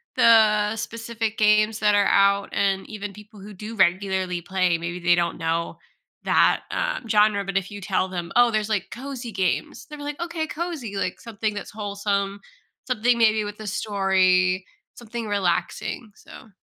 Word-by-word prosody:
the 215 -2 +5
specific 225 0 -4
games 215 0 +3
that 210 -1 +3
are 205 0 +4
out, 200 0 +3
and 195 -1 0
even 205 -2 -6
people 210 +1 -14
who 205 +2 -10
do 210 +4 -8
regularly 190 -1 +1
play, 185 -1 +1
maybe 170 +1 -5
they 175 0 +4
don't 170 -1 -1
know 165 0 -2 0.5
that, - - +3
uh, - - -1
genre 210 -1 +3
but 195 0 -1
if 195 0 -2
you 205 - -7
tell 190 -1 0
them, 175 -2 -5
"Oh, 245 -1 +5
there's, 215 -1 -1
like, 210 -5 -1
cozy 255 -1 -6
games," 190 -4 -2
they're 300 -1 -10
like, 290 0 -5
"Okay, 335 -2 -3
cozy," 310 - -5
like, 185 -2 -3
something 220 -2 -3
that's 205 - -7
wholesome, 200 -1 -2 0.5
something 245 -1 +2
maybe 220 -2 +3
with 205 +1 -7
a 215 - -7
story, 190 -2 +2 0.3
something 235 -1 -6
relaxing, 200 +3 -2
so 230 - -14
205 Hz, 165 wpm, -24 LUFS, 190-225 Hz, 0.5 s, the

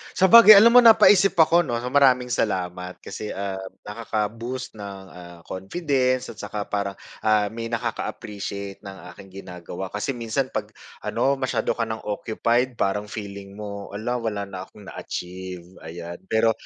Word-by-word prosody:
Sabagay, 215 +4 +9
alam 235 +3 +6
mo 245 - +9
napaisip 205 -3 +7
ako 170 +2 +5
'no. 120 -6 -2
Maraming 130 -2 +4
salamat. 90 -6 -2
Kasi, 105 - -7
ah, 100 0 -4 0.3
nakaka-boost 115 +4 -4
ng, 100 -2 -8
ah, 85 -1 -12
confidence 130 - -1
at 115 - -9
tsaka 105 -1 -5
parang, 100 -1 -2 0.3
ah, 105 -1 +3
may 115 +2 -6
nakaka-appreciate 100 -3 -5
ng 95 -1 -9 0.2
aking 95 - -13 0.2
ginagawa. 90 +1 -7
Kasi 105 +8 -3
minsan 120 +2 -2
pag - - -3 0.3
ano, 135 0 0
masyado 130 -1 -1
ka 115 -1 -2
ng 110 0 -5
occupied 115 +4 -1
parang 105 -1 -1
feeling 100 -2 -8
mo, 100 -1 -7
"Hala, 120 +4 -2
wala 110 -3 -3
na 95 -1 -8
akong 105 - -16
na-achieve." 90 -1 -7 0.2
ayan. 85 +1 -8
Pero 110 +3 +3
105 Hz, 150 wpm, -23 LUFS, 100-125 Hz, 0.3 s, Sabagay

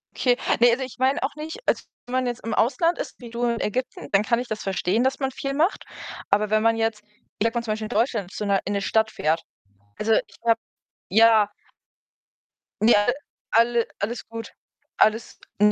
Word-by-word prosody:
Okay. 245 -1 +2 0.2
Ne, 240 0 +6
also 260 +3 0
ich 255 - -8
meine 260 +2 +2
auch 280 +2 -2
nicht 315 +8 -6
also, - - +1 0.2
wenn 250 - -8
man 255 0 +1
jetzt 240 0 -4
im 225 -1 -3
Ausland 305 +9 +2
ist - - -6
wie 240 -2 -10
du 235 +1 -4
in 235 -1 0
Ägypten, 255 +5 -3
dann 200 +1 +4
kann 235 +1 +1
ich 250 - -4
das 215 -2 -4
verstehen, 195 +4 0
dass 265 +2 0
man 265 -1 -1
viel 275 +1 -4
macht. 325 +7 +1 0.4
Aber 210 +1 +2
wenn 215 0 +2
man 225 0 +4
jetzt, 225 -2 -1 0.4
ich 220 - +1
sag 230 - +1
mal 235 - +1
zum 215 -2 -1
Beispiel 215 0 -4
in - - -7
Deutschland 220 -5 0
zu 210 - -4
'ner 200 -1 +2
in 205 - -2
'ne 200 - 0
Stadt 220 +2 +1
fährt, 160 -2 0 0.6
also, 220 +1 +1
ich - - 0
habe 230 0 +4 0.5
ja 220 0 +6 1.3
Ne, 230 +2 +6
alle 205 +4 +3 0.4
alle 235 +1 +3
alles 220 +4 -3
gut. 230 0 -7 0.4
Alles 220 +1 +2 0.2
ne, 210 0 +6
230 Hz, 210 wpm, -24 LUFS, 215-245 Hz, 1.3 s, Ne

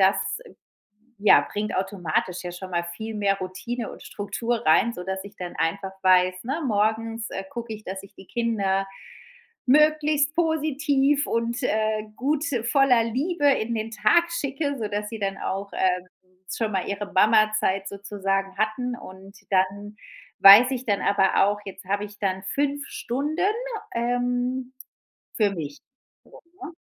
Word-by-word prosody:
das, 190 +1 +5 1.0
ja, 205 +1 +6
bringt 210 +1 -2
automatisch 185 -2 -2
ja 175 - -5
schon 185 +1 -8
mal 170 -1 0
viel 215 +6 -6
mehr 200 -1 +1
Routine 225 +6 -5
und - - -12
Struktur 225 +3 -3
rein, 215 +9 +4
sodass 190 0 -5
ich 200 0 -12
dann 180 -3 -7
einfach 190 +4 -1
weiß, 185 0 +4
ne, 280 +6 -2
morgens, 220 0 0
äh, 195 - -4
gucke 235 -2 -6
ich, 215 0 -10
dass 190 0 -6
ich 195 - -15
die 190 - -14
Kinder 200 -5 0 0.8
möglichst 300 +1 +3
positiv 295 -3 +1
und, 235 +2 -1
äh, 215 -2 0
gut, 290 +3 0 0.2
voller 250 -2 +4
Liebe 290 +7 -1
in 235 -4 +1
den 220 0 -3
Tag 340 +9 +4
schicke, 285 -2 -2
sodass 210 -2 -3
sie 225 - -7
dann 195 -1 -2
auch, 195 +1 -4
ähm, 180 -1 0 0.5
schon 225 -2 -1
mal 190 -2 0
ihre 200 0 -4
‚Mama-Zeit' 215 -1 +3
sozusagen 195 -1 -3
hatten. 240 +3 -1
Und 195 -1 -12
dann 200 +2 0 0.4
weiß 205 +6 +10
ich 255 -1 -3
dann 205 -4 +1
aber 195 -1 +3
auch, 205 0 -1
jetzt 190 -1 -9
habe 200 +2 -1
ich 205 0 -14
dann 190 -1 -1
5 285 +6 -1
Stunden, 300 +9 -2 0.5
ähm, 245 +2 -1 0.6
für 210 -2 +3
mich 150 -6 -6 0.4
so, - - -16 0.2
ne? - - -6
215 Hz, 150 wpm, -25 LUFS, 195-250 Hz, 1.0 s, weiß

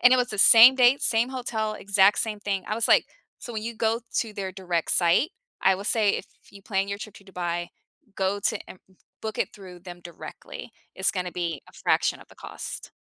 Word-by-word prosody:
And 250 +1 +6
it - - +6
was 250 -1 +1
the 210 - -6
same 230 +5 +9
dates, 255 +2 +4
same 235 +2 +1
hotel, 225 -4 -3
exact 200 0 +3
same 215 -2 -3
thing. 195 -2 -2
I 215 - -1
was 230 - +1
like - - +5 0.3
so 240 - -8
when 220 -1 -4
you 235 +1 -5
go 225 +1 0 0.2
to 225 -2 -2
their 195 -2 -5
direct 175 -3 -2
site, 175 - +3 0.3
I 190 - +4
will 195 - -7
say 215 -1 +2
if - - -3 0.3
you 200 -1 -14
plan 195 -1 -1
your 200 0 -4
trip 210 -1 -9
to 200 - -16
Dubai, 175 -2 -4 0.5
go 195 +1 0
to 215 +2 0
Em - - -11 0.4
book 220 0 -5
it - - 0
through 185 -3 -12
them 175 -1 -10
directly. 175 - -10 0.2
It's 190 - +1
gonna 180 -2 -4
be 170 -5 -4
a - - -17
fraction - - 0
of - - -17
the - - -19
cost. - - -8
200 Hz, 220 wpm, -25 LUFS, 185-225 Hz, 0.5 s, same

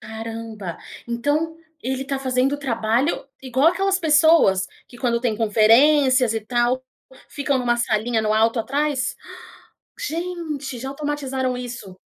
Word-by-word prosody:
Caramba. 220 -3 -7 0.3
Então 290 +7 -1 0.3
ele 260 +2 -2
está 275 0 -3
fazendo 260 0 +1
o 290 - -2
trabalho 235 +2 0 0.2
igual 260 +4 +3
aquelas 385 +2 +1
pessoas, 310 - +4 0.2
que 245 - -14
quando 235 -2 0
tem 235 -3 -1
conferências 250 +4 +4
e 225 - -1
tal, 240 +3 0 0.5
ficam 280 -1 -1
em 250 - -2
uma 240 -1 +2
salinha 225 0 0
no 215 0 +1
alto 225 +2 +2
atrás? 270 +1 -1
Ah! - - -12 0.7
Gente, 325 - -4
já 265 +3 -5
automatizaram 270 -3 -2
isso. 240 -6 -7
255 Hz, 140 wpm, -22 LUFS, 230-290 Hz, 0.7 s, pessoas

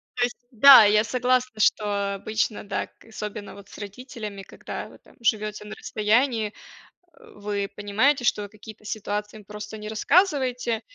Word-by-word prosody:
То 245 - +1
есть, 245 - -1
да, 260 0 +9
я 210 +1 +4
согласна 250 -1 0
что 205 -2 +1
обычно, 215 +2 -2
да. 205 - -3
К - - -24
особенно 210 -2 -7
вот 200 0 -14
с - - -12
родителями, 210 -1 -8
когда - - -8
вы - - -16
там - - -23
живёте 215 -2 -1
на 210 - -8
расстоянии, 220 0 0 0.6
э, - - -18
вы 205 -1 -3
понимаете, 245 +7 +1
что 205 -3 0
какие-то 215 +1 -13
ситуации 210 0 -4
им 210 - -14
просто 210 +1 -8
не 210 0 -8
рассказываете. 250 - +1
215 Hz, 160 wpm, -25 LUFS, 205-245 Hz, 0.6 s, да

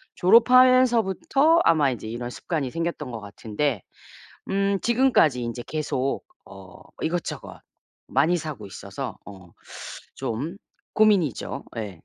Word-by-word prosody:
졸업하면서부터 255 - +4
아마 150 -4 +4
이제 110 -3 -6
이런 120 +2 -5
습관이 145 -5 -3
생겼던 165 -5 -4
것 115 - -6
같은데 105 +3 -3 0.7
음 195 0 +1
지금까지 235 - +3
인제 120 +1 -5
계속 140 -3 -2 0.2
어 - - -13 0.2
이것저것 170 +2 -4 0.5
많이 160 +7 +2
사고 155 -4 -6
있어서 100 +7 -7
어 95 -4 -13 0.6
좀 145 - -4 0.4
고민이죠. 205 - +1
예. 105 -3 -4
155 Hz, 255 characters per minute, -24 LUFS, 120-205 Hz, 0.7 s, 졸업하면서부터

